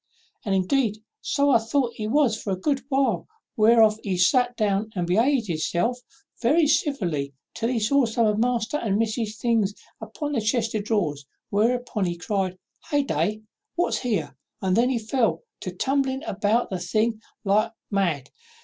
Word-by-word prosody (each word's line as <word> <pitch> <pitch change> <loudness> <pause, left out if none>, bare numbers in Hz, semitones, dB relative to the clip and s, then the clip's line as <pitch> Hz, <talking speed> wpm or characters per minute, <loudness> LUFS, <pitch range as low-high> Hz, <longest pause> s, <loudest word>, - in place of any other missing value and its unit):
And, 195 -2 0
indeed, 215 +3 +1 0.2
so 280 0 +2
I 235 - +6
thought 235 +2 0
he 215 -3 -4
was 255 -2 +3
for 215 - -6
a 190 - +1
good 275 +5 0
while, 270 -1 +1 0.3
whereof 220 -1 +5
he 190 -3 -1
sat 245 +6 +3
down 210 0 0
and 180 -2 -1
behaved 230 +8 +2
himself 175 +7 -1 0.4
very 300 +7 +4
civilly, 180 - 0 0.2
till 230 0 -2
he 250 -2 0
saw 260 +5 +3
some 225 +1 +1
of 210 0 +1
master's 245 +3 0
and 205 -3 +1
miss's 220 -1 -1
things 225 -4 +1 0.3
upon 295 -2 -5
the 250 -6 0
chest 225 +1 0
of 210 -2 -2
drawers; 150 -11 -1 0.2
whereof 235 +5 +2 0.2
he 175 0 -3
cried, 190 0 -2 0.3
'Hey 290 -2 +2
day! 215 -5 -1 0.3
what's 350 - +1
here?' 165 - -2 0.2
and 185 -1 +1
then 240 +3 +3
he 260 - +1
fell 230 - 0 0.2
to 185 - -5
tumbling 265 - 0
about 215 -4 0
the 185 - -2
things 215 +5 0 0.2
like 205 +2 +3
any - - -14 0.2
mad. 170 -9 0
220 Hz, 170 wpm, -25 LUFS, 195-250 Hz, 0.4 s, I